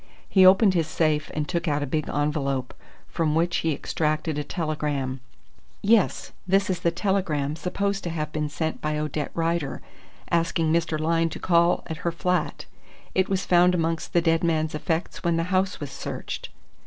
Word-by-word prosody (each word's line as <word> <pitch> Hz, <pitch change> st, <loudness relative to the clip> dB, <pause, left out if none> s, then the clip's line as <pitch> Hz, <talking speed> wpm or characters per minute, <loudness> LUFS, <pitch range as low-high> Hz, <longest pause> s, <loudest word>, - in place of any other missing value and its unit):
He 190 Hz, -2 st, +6 dB
opened 195 Hz, +1 st, +6 dB
his 165 Hz, -3 st, +1 dB
safe 155 Hz, -2 st, 0 dB
and 150 Hz, -1 st, -1 dB
took 170 Hz, -1 st, -2 dB
out 145 Hz, -1 st, +1 dB
a -, -, -1 dB
big 150 Hz, +2 st, -2 dB
envelope, 140 Hz, -3 st, -1 dB, 0.3 s
from 155 Hz, -3 st, 0 dB
which 170 Hz, +1 st, +2 dB
he 165 Hz, -, 0 dB
extracted 155 Hz, +1 st, -1 dB
a -, -, -2 dB
telegram. 150 Hz, -6 st, -2 dB, 0.6 s
"Yes, 210 Hz, -1 st, +2 dB, 0.2 s
this 195 Hz, +1 st, +3 dB
is 180 Hz, -, -2 dB
the 170 Hz, -, +2 dB
telegram 170 Hz, -5 st, 0 dB
supposed 200 Hz, +4 st, -2 dB
to -, -, -1 dB
have 155 Hz, -2 st, -3 dB
been 150 Hz, -1 st, -2 dB
sent 160 Hz, +1 st, -3 dB
by 150 Hz, 0 st, -1 dB
Odette 150 Hz, -1 st, -2 dB
Rider, 165 Hz, -3 st, -1 dB, 0.5 s
asking 165 Hz, -1 st, +1 dB
Mr. 165 Hz, -2 st, 0 dB
Lyne 165 Hz, +1 st, +1 dB
to -, -, -6 dB
call 170 Hz, 0 st, +3 dB
at 160 Hz, -2 st, -5 dB
her 170 Hz, -, -1 dB
flat. 180 Hz, -1 st, -1 dB, 0.5 s
It 190 Hz, 0 st, +1 dB
was 195 Hz, 0 st, 0 dB
found 180 Hz, 0 st, +5 dB
amongst 165 Hz, -1 st, -1 dB
the 175 Hz, -, +4 dB
dead 165 Hz, 0 st, +2 dB
man's 160 Hz, -2 st, +1 dB
effects 160 Hz, +3 st, -2 dB
when 170 Hz, -2 st, +2 dB
the 165 Hz, -, +1 dB
house 190 Hz, +2 st, +1 dB
was 145 Hz, -3 st, -6 dB
searched." -, -, -6 dB
165 Hz, 180 wpm, -25 LUFS, 150-175 Hz, 0.6 s, He